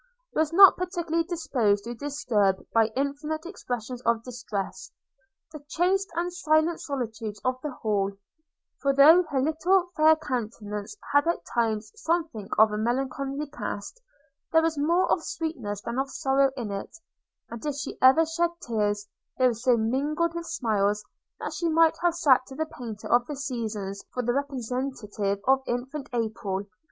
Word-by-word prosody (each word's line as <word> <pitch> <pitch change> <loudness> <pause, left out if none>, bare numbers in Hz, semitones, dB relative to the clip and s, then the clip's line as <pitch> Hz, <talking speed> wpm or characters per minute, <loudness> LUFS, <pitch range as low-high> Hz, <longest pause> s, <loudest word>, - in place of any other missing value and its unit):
was 315 0 +1
not 385 +2 +8
particularly 345 -2 -1
disposed 275 - 0
to 235 +2 -5
disturb, 230 -8 0
by 225 -1 +5
infantine 285 +3 -2
expressions 245 - -5
of 230 -2 +1
distress, 215 -6 -5 0.6
the 305 -2 -10
chaste 375 +5 +1
and 350 +1 -1
silent 315 -1 +2
solitudes 225 -6 -4
of 255 0 0
the 300 - -3
Hall; 205 -6 -1 0.7
for 275 -1 +2
though 310 +6 +8
her 275 - 0
little 345 +6 +2
fair 315 0 +6
countenance 230 - -5 0.2
had 285 +3 +4
at 340 - -1
times 220 -2 0
something 330 - -2
of 220 0 +6
a 210 - -2
melancholy 270 +4 -1
cast, 240 - -6 0.5
there 320 -1 +5
was 325 -1 +1
more 335 +6 +2
of 325 - +2
sweetness 310 -11 -4
than 235 +2 -3
of 270 0 -1
sorrow 270 0 +2
in 225 -5 -4
it; 200 +10 -6 0.5
and 235 -1 -7
if 295 -2 -2
she 285 0 -6
ever 265 +5 +7
shed 335 +2 0 0.2
tears, 210 -3 -1 0.3
they 255 - +3
were 250 - +4
so 235 +2 +2
mingled 290 +9 0
with 340 0 -5
smiles, 210 -7 0 0.3
that - - -4
she 340 - -1
might 325 0 +4
have 345 -1 +2
sat 260 -6 +4
to 265 - -10
the 315 +3 -1
painter 230 -8 -8
of 240 0 +3
the 295 - -4
Seasons 220 -7 -4
for 250 - -3
the 240 +1 +1
representative 250 -6 -2
of 265 0 +5
infant 265 +4 -4
April. 215 -5 -2
265 Hz, 160 wpm, -27 LUFS, 225-315 Hz, 0.7 s, not